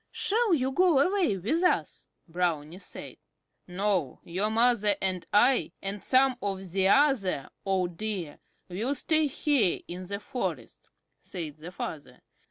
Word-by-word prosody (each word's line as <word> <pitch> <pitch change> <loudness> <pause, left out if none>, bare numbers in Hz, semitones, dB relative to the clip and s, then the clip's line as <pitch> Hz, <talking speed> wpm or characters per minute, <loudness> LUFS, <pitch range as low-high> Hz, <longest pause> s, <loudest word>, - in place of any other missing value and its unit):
"Shall 435 -3 +1
you 265 -2 -1
go 345 +1 +3
away 345 - +2
with 250 - 0
us?" 360 - 0 0.2
Brownie 170 -1 -2
said. - - -9 0.5
"No, 185 -6 -1
your 190 +5 -1
mother 220 -2 +3
and 185 -2 -1
I, 245 +5 +3
and 195 +1 -5
some 260 -1 +3
of 195 -3 -4
the 190 +1 +2
other 205 - +2 0.2
old 180 -3 0
Deer 195 -8 -4 0.3
will 220 +10 -2
stay 310 +3 +1
here 270 - +1
in 180 +1 -7
the 200 +1 -4
forest," 250 +3 -5 0.3
said 160 -5 -7
the 160 +3 -9
father. 145 -7 -7
200 Hz, 140 wpm, -28 LUFS, 180-265 Hz, 0.5 s, go